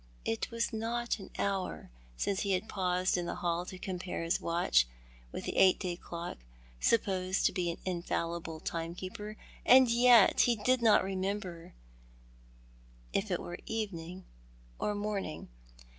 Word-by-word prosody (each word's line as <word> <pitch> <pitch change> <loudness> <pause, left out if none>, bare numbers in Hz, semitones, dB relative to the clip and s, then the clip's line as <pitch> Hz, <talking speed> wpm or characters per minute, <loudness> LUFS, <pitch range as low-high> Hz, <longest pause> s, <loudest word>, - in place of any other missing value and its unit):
It 115 - -1
was 230 0 -1
not 230 +1 -1
an 195 - -9
hour 195 - -2 0.3
since 195 - 0
he 200 -1 0
had 185 +4 -1
paused 185 -2 +1
in 175 -1 -2
the - - -3
hall 175 0 -1
to 185 - -7
compare 180 -2 -4
his 165 +3 0
watch 165 - +3 0.4
with - - -5
the - - -3
eight 185 -1 +6
day 180 -3 -2
clock, 170 - -7 0.4
supposed 190 - +1
to - - +4
be 180 -2 -1
an 170 - -3
infallible 170 -2 -2
timekeeper; 185 +6 -5 0.3
and 255 -1 +7
yet 240 -2 +6
he 240 - +5
did 250 +4 +2
not 225 -4 +5
remember 190 - -4 1.4
if 200 +2 0
it 180 - 0
were 175 - -7
evening 185 -5 -4 0.5
or 210 - 0
morning. 205 - -3
185 Hz, 145 wpm, -32 LUFS, 175-210 Hz, 1.4 s, and